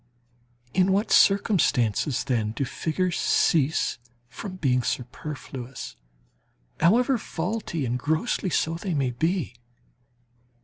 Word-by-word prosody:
In 185 +1 +3
what 200 +4 +1
circumstances, 145 - +3
then, 115 -5 -1
do 135 - -2
figures 170 +7 -2
cease 155 -5 +2 0.3
from 185 - -7
being 130 -8 +1
superfluous, 130 0 -6 0.8
however 240 - +3
faulty, 175 -5 -3
and 125 +1 -1
grossly 160 - 0
so, 160 -1 0
they 170 +1 -3
may 135 -3 0
be? 160 +4 -1
160 Hz, 100 wpm, -25 LUFS, 125-185 Hz, 0.8 s, In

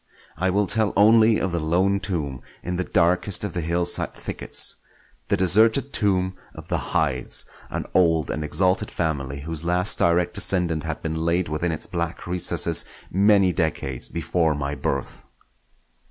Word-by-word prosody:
I 95 - 0
will 100 +2 +1
tell 105 +2 +2
only 110 +2 +5
of 95 - -2
the 85 - -1
lone 90 +5 +1
tomb 75 -10 -4 0.2
in 90 - -3
the 90 - -1
darkest 90 +4 +1
of 100 -5 -4
the 85 - -2
hillside 85 +2 0
thickets; - - -2 0.5
the - - +1
deserted 110 +9 +3
tomb 95 -3 +1 0.2
of 80 +1 -11
the 90 0 -3
Hydes, 70 -6 +1 0.2
an - - -4
old 80 -4 +2
and 75 - -3
exalted 90 +5 0
family 70 -5 -3
whose 80 +1 -4
last 90 +3 +1
direct 85 +1 +2
descendant 90 -5 +1
had 80 -2 -5
been 80 0 -3
laid 85 0 0
within 75 +3 -2
its 80 - -3
black 85 -1 -4
recesses 90 0 +2 0.3
many 100 -1 +3
decades 75 -7 -2
before 85 -1 0
my 70 -1 -3
birth. - - -4
85 Hz, 155 wpm, -23 LUFS, 80-95 Hz, 0.5 s, only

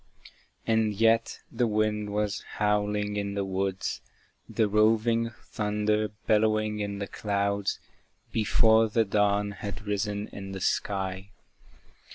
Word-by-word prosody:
And 110 -2 +2
yet 115 +2 +2
the 120 - +1
wind 105 -1 0
was 105 0 -1
howling 105 0 0
in 100 -1 -2
the 100 -1 -1
woods, 95 0 -2 0.5
The 110 - +1
roving 110 +2 +3
thunder 105 0 0 0.2
bellowing 110 0 +2
in 100 -1 -3
the 100 - -3
clouds, 100 -1 -1 0.5
Before 110 +1 +4
the 110 +1 +2
dawn 100 0 +1
had 100 +1 -7
risen 105 0 -2
in 95 -1 -8
the 95 - -5
sky. 95 0 -1
105 Hz, 120 wpm, -28 LUFS, 100-110 Hz, 0.5 s, Before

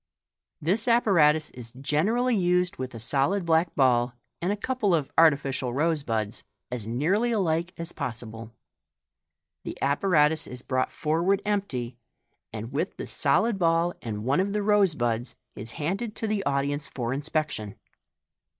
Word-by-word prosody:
This 200 +10 0
apparatus 165 -10 +4
is 120 -2 -11
generally 195 - +1
used 180 -1 +1
with 130 -2 -5
a - - -6
solid 140 - +1
black 165 +1 +2
ball 125 -2 +3 0.3
and 180 +3 0
a 205 - -1
couple 225 -5 +1
of 150 -4 -2
artificial 135 -5 +3
rose 160 +1 +1
buds, 110 -5 -2 0.3
as 120 -4 -4
nearly 180 - +1
alike 170 -5 0
as 170 0 -3
possible. 115 -5 -6 1.1
The - - -6
apparatus 150 +1 +2
is 125 0 -6
brought 130 -1 0
forward 170 +6 +1
tmpty, 130 - -2 0.5
and 110 +2 -6
with 160 +7 -2
the - - -5
solid 225 -3 +1
ball 170 0 +2
and 105 -3 -5
one 135 +5 +2
of 200 +2 0
the 210 -1 0
rose 205 -5 +3
buds, 120 0 -1 0.2
is 115 +3 -6
handed 195 +9 -3
to - - -3
the 210 -2 -1
audience 140 +1 0
for 125 -3 -3
in 140 - -2
spection. 150 -9 -2
155 Hz, 150 wpm, -26 LUFS, 125-190 Hz, 1.1 s, apparatus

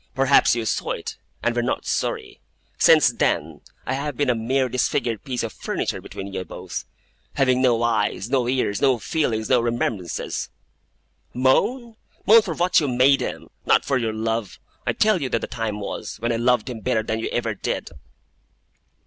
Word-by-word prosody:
Perhaps 135 -2 +4
you 115 -1 -2
saw - - -1
it, - - -6 0.3
and 120 - +1
were 120 - +1
not 120 - -2
sorry. - - -3 0.4
Since - - +6
then, 75 0 -1 0.2
I 130 - -1
have 140 -1 -3
been 145 -3 +2
a - - +2
mere 130 +4 0
disfigured 120 -3 -1
piece 125 -3 -3
of 115 - -4
furniture - - -3
between 95 0 -8
you 95 - -3
both; 90 - -7 0.5
having 130 -2 +2
no 120 -3 +3
eyes, 110 -3 0
no 125 -1 +1
ears, 125 -5 0
no 135 -3 +4
feelings, 110 -4 -1
no 125 - +4
remembrances. 115 -6 -2 0.9
Moan? 225 - +1 0.3
Moan 225 +2 +8
for 180 -7 -4
what 180 +3 +3
you 150 - -1
made 130 +2 +4
him; - - -5 0.2
not - - +4
for 135 -2 +1
your 115 -2 -1
love. 110 -1 -2 0.3
I - - +2
tell 215 -5 +2
you 135 - -2
that 115 - 0
the - - -2
time 110 -2 -4
was, 100 - -5
when 120 +2 -1
I 115 - 0
loved 120 -1 +2
him 120 -3 -5
better 110 -1 0
than 110 +1 -2
you 115 - -3
ever 115 -2 -1
did! 95 - -4
120 Hz, 185 wpm, -23 LUFS, 110-135 Hz, 0.9 s, Moan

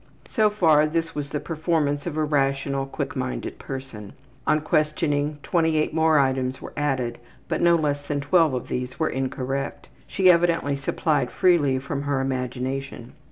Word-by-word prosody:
So 215 -2 +3
far, 160 -7 +4
this 165 +1 -2
was 145 -1 -4
the 150 - -2
performance 155 -2 -1
of 155 -3 -4
a 155 - +2
rational, 140 -2 0
quick 140 0 -4
minded 130 -1 -4
person. 130 -7 -7 0.3
On 155 - +4
questioning, 150 -1 0
28 160 -3 +1
more 160 -1 +4
items 130 -2 +1
were - - -9
added, 130 -5 -1 0.3
but 160 - -1
no 170 0 +5
less 145 -3 0
than 145 0 -3
12 155 +1 +3
of 125 - -4
these 125 +3 -4
were 160 - +1
incorrect 135 +1 -3 0.2
she 185 -1 +5
evidently 170 -4 +2
supplied 140 -1 0
freely 155 -8 +3
from 140 +1 -4
her 140 -1 -1
imagination. 130 -1 -3
145 Hz, 160 wpm, -24 LUFS, 135-160 Hz, 0.3 s, no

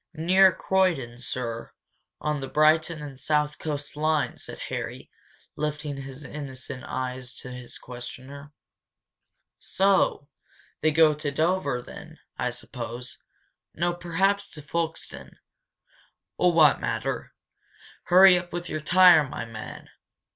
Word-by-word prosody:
"Near 185 +4 +5
Croydon, 170 -11 0
sir, 115 -2 -4 0.5
on 150 -1 -1
the 135 - -5
Brighton 155 +1 +3
and 140 -3 -9
South 150 0 0
Coast 145 -2 -5
Line," 155 0 +1
said - - -8
Harry, - - -5 0.4
lifting 150 -1 -3
his 135 +1 -8
innocent 130 -3 -6
eyes 130 0 -4
to 125 - -9
his 125 -1 -8
questioner. 130 +4 -9 1.1
"So! 190 -6 +2 0.5
They 155 - +4
go 155 0 +5
to 150 0 -3
Dover, 145 -4 0
then, - - -11 0.2
I - - -1
suppose 120 +2 -7 0.6
no, 175 +2 0
perhaps 195 +4 0
to 150 - -9
Folkestone 165 +2 -4 1.0
oh, 180 - +4
what 160 -4 +5
matter? - - -3 0.7
Hurry 185 0 +7
up 175 0 -10
with 175 0 -5
your 155 - -3
tire, 175 -3 +6
my - - -5
man!" 115 -1 -9
150 Hz, 120 wpm, -26 LUFS, 135-170 Hz, 1.1 s, Hurry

